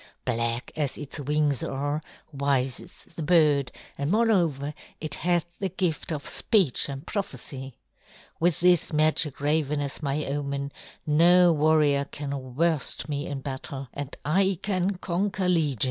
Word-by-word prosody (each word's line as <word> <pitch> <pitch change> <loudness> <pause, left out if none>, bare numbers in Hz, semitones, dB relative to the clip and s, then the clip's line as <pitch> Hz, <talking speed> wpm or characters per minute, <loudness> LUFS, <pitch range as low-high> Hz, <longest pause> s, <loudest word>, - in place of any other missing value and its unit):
Black 115 -1 -1
as 145 -4 -1
its 150 0 -6
wings 145 -1 +1
are, 145 +3 -2 0.3
wise 135 -2 +1
is - - -12 0.2
the - - -5
bird, 150 -5 +3 0.3
and 140 +1 -1
moreover 175 - +2 0.3
it 155 -2 -3
hath 175 +1 +1
the 195 - -1
gift 175 -3 -2
of 150 -3 -3
speech 185 - +2
and 135 0 -6
prophecy. 135 - -5 0.6
With 170 0 +2
this 180 -2 +4
magic 155 -1 +2
raven 150 0 +1
as 140 +1 -2
my 145 0 -1
omen, 140 0 -3 0.3
no 175 +3 +6
warrior 150 -2 +3
can 140 -4 -6
worst 160 -1 +1
me 145 0 -2
in 140 -1 -4
battle, 135 -1 -6
and 145 -1 -5
I 190 +4 +2
can 190 -1 0
conquer 190 +1 -1
legions. 155 -8 +1
150 Hz, 145 wpm, -26 LUFS, 140-170 Hz, 0.6 s, no